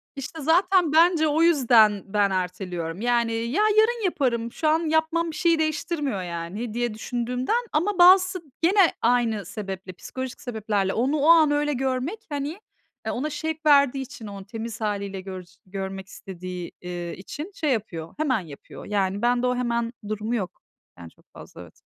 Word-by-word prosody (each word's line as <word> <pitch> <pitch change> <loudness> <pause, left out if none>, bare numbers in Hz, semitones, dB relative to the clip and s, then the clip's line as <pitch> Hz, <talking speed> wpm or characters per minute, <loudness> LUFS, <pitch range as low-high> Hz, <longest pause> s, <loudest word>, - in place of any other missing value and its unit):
İşte, 295 +4 -7
zaten 355 +2 +3
bence, 330 -1 +5
o 300 +2 +1
yüzden 240 - +5
ben 205 -2 +3
erteliyorum. 180 -1 -3
Yani, 235 -1 +1
ya, 235 - -1 0.2
yarın 450 +1 +3
yaparım, 235 -9 0
şu 315 - -2
an 320 +1 +2
yapmam 320 +1 +1
bir - - -10
şeyi 335 0 +2
değiştirmiyor, 305 - -1
yani, 175 +7 -5
diye 240 -2 -1
düşündüğümden, 250 - -2
ama 360 +5 0
bazısı 370 +1 +6 0.2
gene 375 +1 +4
aynı 230 -3 +1
sebeple, 190 -3 -6
psikolojik 260 +7 -7
sebeplerle 210 -5 -1
onu 265 +7 +1
o 295 +3 +2
an 315 -3 +7
öyle 295 0 +1
görmek, 265 - -2
hani 290 +6 -4 0.5
e, - - -1
ona 295 +5 -2
şevk 315 +1 -4
verdiği 280 -2 +5
için 230 -4 -9
onu 200 -1 -8
temiz 225 0 -7
hâliyle 200 -2 -3
gör 185 -1 -7 0.2
görmek 190 0 -6
istediği, 180 -3 -8
eee, 175 -1 -5
için 295 - -7
şey 300 -3 0
yapıyor, 170 -8 -3
hemen 270 -7 +1
yapıyor. 155 -6 -11
Yani, 200 -1 -1
bende 245 +1 +2
o 250 - +1
hemen 235 -1 -1
durumu 215 +2 -2
yok, 190 -6 -4 0.4
yani, 85 -1 -10
çok - - -28
fazla, - - -12
evet. - - -13
245 Hz, 165 wpm, -25 LUFS, 200-310 Hz, 0.5 s, an